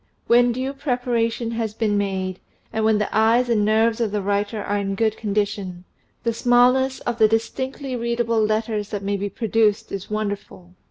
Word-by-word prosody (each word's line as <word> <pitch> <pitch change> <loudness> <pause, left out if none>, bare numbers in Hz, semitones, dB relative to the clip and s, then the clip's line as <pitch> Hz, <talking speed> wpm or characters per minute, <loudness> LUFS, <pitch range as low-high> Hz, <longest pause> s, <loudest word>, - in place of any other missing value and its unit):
When 240 +1 +5
due 260 +3 -3
preparation 245 -4 -1
has 225 -2 -3
been 215 -3 0
made, 190 -2 -2 0.3
and 220 - 0
when 220 -1 +3
the 210 -1 -2
eyes 230 +3 +3
and 220 -3 +2
nerves 220 +2 +2
of 225 - +1
the 205 -1 -2
writer 205 +1 -1
are 205 0 -1
in 195 -1 -2
good 220 +1 +1
condition, 200 -4 -2 0.4
the 230 -1 0
smallness 250 +3 +3
of 240 -1 -3
the 220 - +7
distinctly 260 +4 -2
read 235 0 -2
able 230 -1 +1
letters 215 -1 -1
that 205 -2 -4
may 200 +1 -1
be 200 +1 -3
produced 215 0 +1
is 195 -1 -5
wonderful. 205 -4 -5
220 Hz, 180 wpm, -22 LUFS, 205-235 Hz, 0.4 s, the